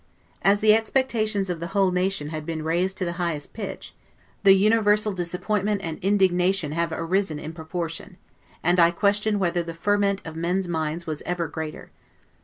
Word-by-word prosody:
As 200 +1 +3
the 215 0 +6
expectations 220 -3 +1
of 175 -2 -3
the 170 - -4
whole 195 -2 +4
nation 180 -4 -1
had 155 -1 -5
been 160 0 -4
raised 175 +4 0
to 185 - -1
the 170 - -2
highest 160 -4 -2
pitch, 205 -4 -6 0.5
the 195 -1 +7
universal 210 +1 +3
disappointment 195 +3 -1
and 160 -2 -4
indignation 190 -4 +2
have 170 +1 -1
arisen 165 0 0
in 155 +2 -7
proportion; 165 +2 -5 0.5
and 175 +2 +3
I 170 0 +7
question 205 +4 +1
whether 175 -3 0
the 165 -1 -7
ferment 200 +2 +1
of 160 -1 -7
men's 175 +3 -1
minds 160 0 -2
was 155 -2 -4
ever 175 -2 -2
greater. 155 0 -7
180 Hz, 170 wpm, -24 LUFS, 165-200 Hz, 0.5 s, the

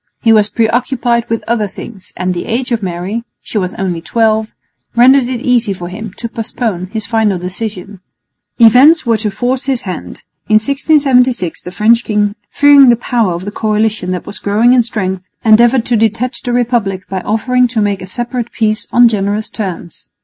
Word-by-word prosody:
He 225 - +5
was 210 -1 +3
preoccupied 240 +1 0
with 230 0 -2
other 225 -2 0
things, 195 0 -11
and 185 0 -1
the 175 - -5
age 245 +2 -2
of 230 -2 0
Mary 185 +5 -4 0.2
she 215 - -4
was 185 -2 -3
only 180 -4 -3
twelve 220 +2 +1 0.5
rendered 255 +2 +5
it 250 -2 -4
easy 240 -5 +1
for 175 -2 -7
him 215 +3 -7
to 235 - -6
postpone 225 -5 -4
his 215 +2 -5
final 220 -3 0
decision. 195 +1 -6 0.6
Events 260 +7 +6
were 230 -2 +2
to 215 0 -2
force 245 +6 -2
his 270 -3 -1
hand. 185 -4 -7 0.3
In 215 - +4
1676 255 - +2
the - - -8
French 225 +5 +2
king, 210 -1 0 0.2
fearing 285 -2 +6
the 240 - +5
power 230 -5 -1
of 175 +2 -6
the 205 - -5
coalition 215 -2 -1
that 180 -1 -3
was - - -7
growing 220 +5 +2
in 255 - +5
strength, 190 -5 -4 0.2
endeavoured 235 +3 +4
to 245 - +1
detach 225 +3 -1
the 245 - -3
republic 235 -6 -1
by 190 -1 -4
offering 250 +5 +1
to 235 -2 -3
make 205 -2 -1
a 185 - -8
separate 240 +3 -4
peace 215 -1 -1
on 240 0 +6
generous 210 -1 -2
terms. 185 -5 -7
220 Hz, 185 wpm, -13 LUFS, 200-240 Hz, 0.6 s, Events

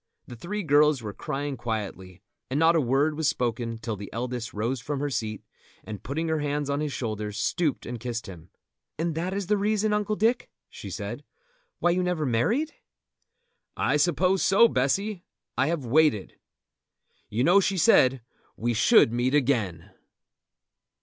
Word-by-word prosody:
The 120 - -10
three 200 - -4
girls 150 -3 +3
were 105 -2 -5
crying 145 +1 -4
quietly, 105 -6 -5 0.3
and 135 +3 -1
not 165 +1 +5
a 160 - +3
word 140 +4 +1
was 160 -1 +1
spoken 115 -1 -2
till 115 -1 -4
the 100 0 -8
eldest 120 0 -4
rose 115 +4 -2
from 140 +3 -3
her 145 0 -2
seat, 110 -3 -3 0.4
and 105 -2 -7
putting 160 +5 -3
her 160 -1 0
hands 145 -1 -2
on 140 - -1
his 150 -1 -2
shoulders, 105 -4 -4
stooped 150 +4 -1
and 120 0 -5
kissed 120 0 -4
him. 90 -3 -11 0.5
"And 165 +1 -1
that 170 +4 -2
is 200 0 -2
the 210 +3 +1
reason, 210 +1 +1
Uncle 210 0 0
Dick," 230 +3 +1 0.2
she - - -9
said, - - -6 0.5
"why 175 - +2
you 180 +1 +1
never 180 -4 -1
married?" 210 - 0 1.0
"I - - +1
suppose 180 +4 +2
so, 205 +5 +6
Bessy. 185 - 0 0.3
I 135 - +2
have 160 -5 -2
waited. 135 -5 +2 1.0
You 110 +4 0
know 175 +7 +6
she 195 0 0
said 130 -6 +4 0.3
we 120 +1 0
should 110 +1 +5
meet 125 +3 +1
again!" 115 - 0
140 Hz, 165 wpm, -26 LUFS, 115-170 Hz, 1.0 s, so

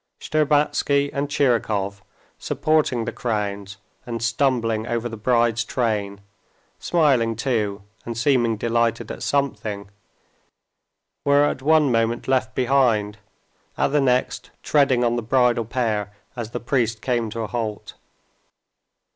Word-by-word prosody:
Shtcherbatsky 145 -2 +1
and 140 +1 -2
Tchirikov, 110 -8 0 0.4
supporting 150 -7 0
the 115 - -3
crowns 100 -4 -3 0.3
and 120 -2 -5
stumbling 120 -3 0
over 120 0 -2
the 115 - -7
bride's 115 0 +1
train, 105 -5 -2 0.6
smiling 135 -9 +2
too 110 -4 -1 0.2
and 115 -1 -6
seeming 120 -3 +2
delighted 115 0 0
at - - -8
something, 105 -8 -2 1.3
were 140 0 +4
at 135 - -2
one 150 -1 +3
moment 115 0 0
left 130 -1 0
behind, 120 -6 +1 0.6
at - - +2
the 145 +1 +2
next 125 -1 0
treading 135 -4 +3
on 120 0 +1
the - - -1
bridal 120 0 +2
pair 110 -4 -1 0.2
as 120 -3 -5
the 120 - -5
priest 115 -3 -1
came 120 -3 0
to 115 +2 -5
a 110 - -3
halt. 110 -3 -4
120 Hz, 125 wpm, -22 LUFS, 110-135 Hz, 1.3 s, were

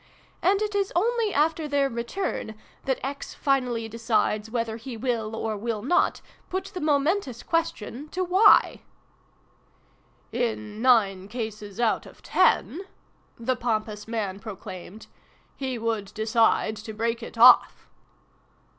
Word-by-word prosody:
And 395 +3 +3
it 420 0 -3
is 400 -1 0
only 450 +3 +1
after 315 +1 +1
their 285 -1 +2
return 235 - -4 0.3
that 265 -1 +1
X 280 +1 -6
finally 250 -5 0
decides 220 -1 0
whether 230 -1 -2
he 235 +1 -8
will, 225 -2 -2
or 220 -1 -2
will 215 0 -3
not, 300 +8 +2 0.3
put 375 +1 -2
the 365 - -5
momentous 295 - 0
question 305 -4 -2
to 370 +3 -2
F/" 385 +4 +5 1.5
"In 220 -3 -3
nine 200 -7 +3
cases 215 -2 -6
out 235 -2 +1
of - - -16
ten," 360 - +2 0.6
the 255 +2 -1
pompous 215 -3 -2
man 205 -4 -3
proclaimed, 200 -1 -9 0.3
" - - -35
he 260 -2 -2
would 220 -3 -2
decide 220 0 +2
to 215 +1 -8
break 230 +2 -1
it 230 - -9
off! 245 +2 +6
235 Hz, 130 wpm, -26 LUFS, 220-285 Hz, 1.5 s, off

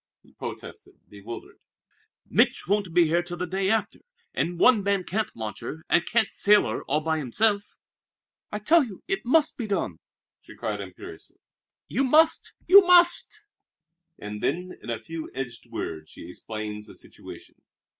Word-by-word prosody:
he - - -23
protested, - - -9
bewildered. 105 +3 -10 0.7
"Mich' - - +2
won't 200 -2 0
be 175 0 +4
here 165 +2 +2
till 175 0 -8
the 180 - -2
day 190 +2 -1
after 225 +1 -1 0.3
and 175 +1 -2
one 230 +3 +5
man 200 -1 0
can't 215 +4 -3
launch 110 -3 -6
her, 160 +1 -8
and 175 - +2
can't 225 -2 +1
sail 210 0 +4
her - - -3
all 150 +3 0
by 160 0 -1
himself." 200 - 0 0.7
"I 210 - -3
tell 310 +10 +4
you 210 -8 -9
it 390 +1 -2
must 310 +4 +3
be 235 - -4
done," 175 - -2 0.4
she - - -15
cried 105 -2 -4
imperiously. 90 -4 -11 0.5
"You 265 - 0
must, 315 +5 +3
you 395 +2 +9
must!" 360 +3 +4 0.7
And 105 0 -7
then, 180 +5 -2
in - - -10
a 115 - -1
few 160 +8 -7
edged 125 -3 -6
words, 80 -1 -6
she - - -11
explained 105 +2 -6
the - - -13
situation. - - -13
180 Hz, 165 wpm, -25 LUFS, -, 0.7 s, you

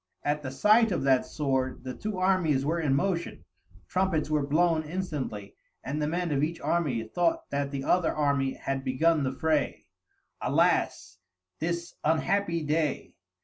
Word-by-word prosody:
At 150 +1 0
the 135 - -5
sight 210 - +4
of 175 - -1
that 130 -2 +3
sword 130 -4 -1
the 130 -1 -5
two 210 - -5
armies 180 -7 +2
were 165 +3 0
in 145 -4 +1
motion, 170 +2 -2 0.4
trumpets 180 - 0
were 150 -1 +2
blown 160 +3 +2
instantly, 150 - -4 0.3
and 150 +3 -3
the 150 - 0
men 175 +1 -1
of 140 -1 +1
each 160 +3 -1
army 145 -10 0
thought 165 +9 0
that 140 0 -1
the 140 -1 -4
other 175 +2 +2
army 140 -3 0
had 135 -1 -3
begun 155 +5 +2
the 130 - 0
fray. 155 +2 -1 0.6
"Alas, 90 - +1 0.4
this 170 +1 -3
unhappy 170 +2 +1
day!" 150 -1 -1
155 Hz, 155 wpm, -28 LUFS, 135-170 Hz, 0.6 s, sight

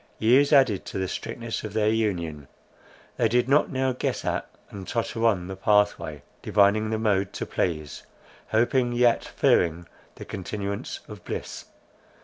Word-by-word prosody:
Years 130 +6 +4
added 130 -9 +4
to - - -6
the 95 -1 -1
strictness 115 +3 -5
of 105 -2 -6
their 110 0 +2
union. 85 -10 -2 0.7
They 115 - +3
did 120 +2 +2
not 140 +3 +3
now 130 -1 0
guess 125 - -3
at, - - -2 0.2
and 95 -2 -8
totter 115 -1 -2
on 95 -6 +1
the 95 +1 -6
pathway, 105 -7 +1 0.2
divining 105 +1 +3
the 110 - -1
mode 100 -3 0
to - - -4
please, 75 -5 -3 0.5
hoping, 120 +2 +1
yet 120 -1 +3
fearing 85 0 +1 0.3
the - - -9
continuance 100 +1 -5
of - - -11
bliss. - - -6
105 Hz, 150 wpm, -25 LUFS, 95-120 Hz, 0.7 s, Years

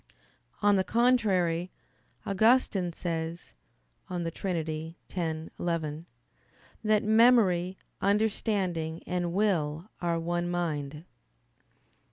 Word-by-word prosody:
On 205 -1 +5
the 190 - +2
contrary, 190 -8 +2 0.6
Augustine 200 -3 +3
says 165 - -4 0.6
(De 175 -2 -2
Trin. 160 -3 -3 0.2
x, 160 -3 -2
11) 165 -1 -2 0.8
that 215 0 +3
"memory, 215 -5 +4 0.2
understanding, 195 -6 0
and 175 -1 -1
will 175 -3 0
are 170 -1 0
one 175 +1 -1
mind." 155 -3 -3
175 Hz, 85 wpm, -29 LUFS, 165-205 Hz, 0.8 s, On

